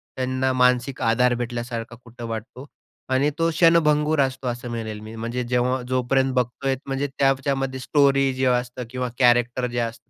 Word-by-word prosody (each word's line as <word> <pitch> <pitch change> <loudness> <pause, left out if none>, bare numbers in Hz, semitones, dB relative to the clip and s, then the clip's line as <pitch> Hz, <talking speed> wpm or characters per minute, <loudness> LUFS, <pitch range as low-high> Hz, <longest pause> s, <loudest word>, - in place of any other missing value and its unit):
त्यांना 130 0 0
मानसिक 125 +1 +2
आधार 120 +2 +3
भेटल्यासारखा 120 -1 -5
कुठं 120 0 -10
वाटतो. 115 +4 -7 0.4
आणि 130 +3 +2
तो 165 0 +3
क्षणभंगुर 155 -2 +3
असतो 130 -1 -2
असं 120 0 -4
म्हणेल 110 -2 -5
मी. 110 +1 -10
म्हणजे 115 +2 -3
जेव्हा 125 +1 0
जोपर्यंत 130 +1 +1
बघतोय 130 +2 -1
म्हणजे 135 +1 -2
त्याच्यामध्ये 135 -1 0
स्टोरी 135 0 +3
जे 130 0 -1
असतं 125 0 0
किंवा 125 -1 -3
कॅरेक्टर 120 0 +3
जे 120 - -2
असतं 115 0 -5
125 Hz, 155 wpm, -23 LUFS, 120-135 Hz, 0.4 s, आधार